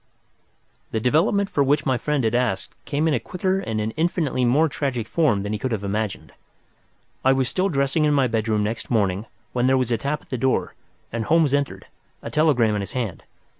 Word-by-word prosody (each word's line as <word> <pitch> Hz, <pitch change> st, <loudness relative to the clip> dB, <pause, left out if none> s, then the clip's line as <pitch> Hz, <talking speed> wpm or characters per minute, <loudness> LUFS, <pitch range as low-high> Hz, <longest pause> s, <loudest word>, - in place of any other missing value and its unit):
The 110 Hz, -, -1 dB
development 170 Hz, -, +2 dB
for 145 Hz, -, +1 dB
which 140 Hz, +1 st, +2 dB
my 130 Hz, -, +2 dB
friend 145 Hz, +2 st, -1 dB
had 110 Hz, -, +1 dB
asked 120 Hz, -6 st, 0 dB
came 150 Hz, +2 st, 0 dB
in 160 Hz, -, +2 dB
a 125 Hz, -, +1 dB
quicker 185 Hz, -, -1 dB
and 110 Hz, -, -3 dB
an 110 Hz, +1 st, -1 dB
infinitely 155 Hz, -4 st, 0 dB
more 145 Hz, +7 st, +4 dB
tragic 130 Hz, -6 st, -2 dB
form 115 Hz, -12 st, +2 dB
than 105 Hz, +1 st, -3 dB
he 105 Hz, -, -2 dB
could 130 Hz, -1 st, -2 dB
have 105 Hz, -3 st, -2 dB
imagined. 105 Hz, 0 st, -3 dB, 0.9 s
I 130 Hz, -, +5 dB
was 130 Hz, -1 st, +1 dB
still 185 Hz, +8 st, 0 dB
dressing 140 Hz, 0 st, +1 dB
in 150 Hz, -, +3 dB
my 135 Hz, -2 st, +4 dB
bedroom 110 Hz, -2 st, 0 dB
next 110 Hz, +2 st, -4 dB
morning, 105 Hz, -2 st, 0 dB, 0.3 s
when 125 Hz, 0 st, +1 dB
there 130 Hz, 0 st, +4 dB
was 125 Hz, -2 st, 0 dB
a 115 Hz, -, +1 dB
tap 145 Hz, +4 st, -2 dB
at -, -, -27 dB
the 130 Hz, -, -2 dB
door 130 Hz, +1 st, 0 dB, 0.4 s
and 115 Hz, -2 st, -2 dB
Holmes 160 Hz, -1 st, +3 dB
entered, 145 Hz, -1 st, -1 dB, 0.4 s
a -, -, -6 dB
telegram 140 Hz, -8 st, +3 dB
in 105 Hz, -, -1 dB
his 100 Hz, -, -6 dB
hand. 115 Hz, -10 st, -3 dB
130 Hz, 210 wpm, -23 LUFS, 110-150 Hz, 0.9 s, I